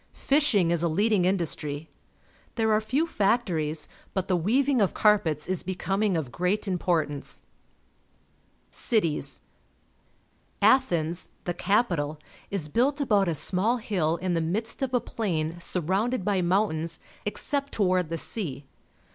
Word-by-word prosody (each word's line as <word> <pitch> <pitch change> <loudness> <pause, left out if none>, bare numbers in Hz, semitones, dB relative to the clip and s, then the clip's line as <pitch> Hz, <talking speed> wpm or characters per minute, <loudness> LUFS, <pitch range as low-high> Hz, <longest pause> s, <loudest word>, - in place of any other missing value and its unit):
Fisliing 240 - +3
is 170 -2 +2
a 170 - +2
leading 200 +3 +2
industry. 160 -5 -1 0.7
There 220 -2 +2
are 215 - +3
few 265 +9 +1
factories, 180 - 0 0.3
but 190 -1 -1
the 185 - +2
weaving 250 - +2
of 195 - +1
carpets 165 -8 +2
is 185 0 -1
becoming 190 +1 0
of 140 -6 -3
great 180 - 0
importance. 165 -6 -1 1.3
Cities. 190 -10 -1 0.6
— - - -39
Athens, 175 -10 +2
the 175 - -2
capital, 175 -7 +1 0.3
is 190 -7 -2
built 260 - +1
about 205 -8 +3
a 165 - 0
small 190 - +1
hill 180 -8 0
in 185 +1 -2
the 165 - +1
midst 210 +11 -2
of 265 -2 -1
a - - +4
plain 175 -8 -2
surrounded 190 +7 0
by 200 -3 +2
mountains 175 -3 0 0.2
except 280 +6 -2
toward 185 -5 +1
the 165 - -2
sea. 150 - -5
185 Hz, 135 wpm, -27 LUFS, 165-215 Hz, 1.3 s, a